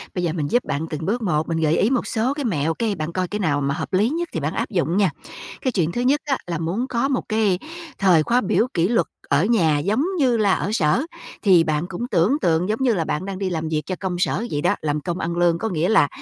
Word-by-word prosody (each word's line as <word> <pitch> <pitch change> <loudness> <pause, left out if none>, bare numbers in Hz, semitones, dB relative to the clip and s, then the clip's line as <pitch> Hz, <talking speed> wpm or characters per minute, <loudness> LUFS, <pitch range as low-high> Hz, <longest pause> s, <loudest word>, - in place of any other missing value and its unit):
Bây 180 - -1
giờ 165 -2 0
mình 155 -4 -2
giúp 245 - +3
bạn 150 +3 -2
từng 155 0 -4
bước 235 +5 -1
một, 155 -7 0
mình 165 - -1
gợi 160 0 +2
ý 210 - +3
một 255 -2 0
số 240 +3 0
cái 285 -1 -4
mẹo, 165 -7 0
cái 220 +2 -1
bạn 155 -1 -4
coi 185 0 -1
cái 210 +4 -4
nào 145 -7 +1
mà 140 0 0
hợp 160 +3 -5
lý 205 +5 +3
nhất 335 +3 -2
thì - - -1
bạn 150 +1 -2
áp - - -2
dụng 175 -3 0
nha. 200 -3 +4 0.5
Cái 260 - 0
chuyện 170 -7 0
thứ 240 - -2
nhất 275 +4 +2
á 275 -3 0
là 170 -1 -2
muốn 185 +10 -2
có 240 +1 0
một 270 -2 -1
cái 215 -4 +2 0.4
thời 180 -5 +4
khóa 245 +9 +2
biểu 220 +3 +1
kỷ 170 0 +2
luật 215 -7 +1 0.2
ở 140 +5 +3
nhà 170 -10 +3
giống 210 - +1 0.2
như 250 -5 +3
là 205 -3 +3
ở - - -1
sở 170 - +2 0.4
thì 185 -6 +5
bạn 155 0 -1
cũng 195 +7 -5
tưởng 210 - +2
tượng 170 +2 +1
giống 215 - 0
như 245 -3 +3
là 170 -6 -1
bạn 155 +5 -2
đang 195 -1 -5
đi 195 -2 -1
làm 160 -2 -3
việc 155 -1 0
cho 185 - -3
công 180 -2 -3
sở 185 +4 0
vậy 145 - -1
đó, - - +2
làm 150 -1 -1
công 175 +3 -3
ăn 170 0 -3
lương. 175 -1 +3
Có 225 +6 -2
nghĩa 175 -1 0
là 205 -10 +5
185 Hz, 280 wpm, -22 LUFS, 160-225 Hz, 0.5 s, thì